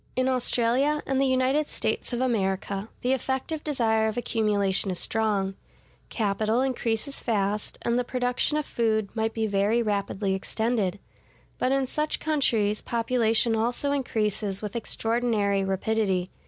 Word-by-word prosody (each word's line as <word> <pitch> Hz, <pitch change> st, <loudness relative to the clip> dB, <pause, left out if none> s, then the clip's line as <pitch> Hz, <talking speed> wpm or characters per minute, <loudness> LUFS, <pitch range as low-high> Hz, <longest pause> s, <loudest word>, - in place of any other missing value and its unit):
In 255 Hz, 0 st, +1 dB
Australia 255 Hz, +3 st, +2 dB
and 270 Hz, 0 st, +1 dB
the 275 Hz, -, +3 dB
United 260 Hz, +3 st, +2 dB
States 220 Hz, -, -2 dB
of 240 Hz, 0 st, -1 dB
America, 200 Hz, -3 st, -1 dB
the 250 Hz, +2 st, +2 dB
effective 265 Hz, +4 st, -2 dB
desire 225 Hz, -7 st, +1 dB
of 220 Hz, -, -3 dB
accumulation 205 Hz, -5 st, +1 dB
is 185 Hz, -, -1 dB
strong; 205 Hz, -3 st, 0 dB, 0.6 s
capital 215 Hz, +2 st, 0 dB
increases 255 Hz, 0 st, -1 dB
fast, 210 Hz, -2 st, -1 dB
and 235 Hz, +1 st, +1 dB
the -, -, +1 dB
production 250 Hz, +4 st, 0 dB
of 305 Hz, -, -1 dB
food 220 Hz, -4 st, 0 dB
might 225 Hz, 0 st, -1 dB
be 225 Hz, -1 st, 0 dB
very 210 Hz, +3 st, +2 dB
rapidly 200 Hz, -2 st, -1 dB
extended. 210 Hz, 0 st, -1 dB, 0.6 s
But 255 Hz, -, +1 dB
in 270 Hz, 0 st, +2 dB
such 300 Hz, +4 st, -1 dB
countries 230 Hz, -9 st, +1 dB
population 230 Hz, -1 st, +1 dB
also 245 Hz, +5 st, 0 dB
increases 210 Hz, -7 st, -1 dB
with 210 Hz, 0 st, -6 dB
extraordinary 225 Hz, -4 st, 0 dB
rapidity. 190 Hz, -1 st, 0 dB
225 Hz, 140 wpm, -26 LUFS, 205-255 Hz, 0.6 s, the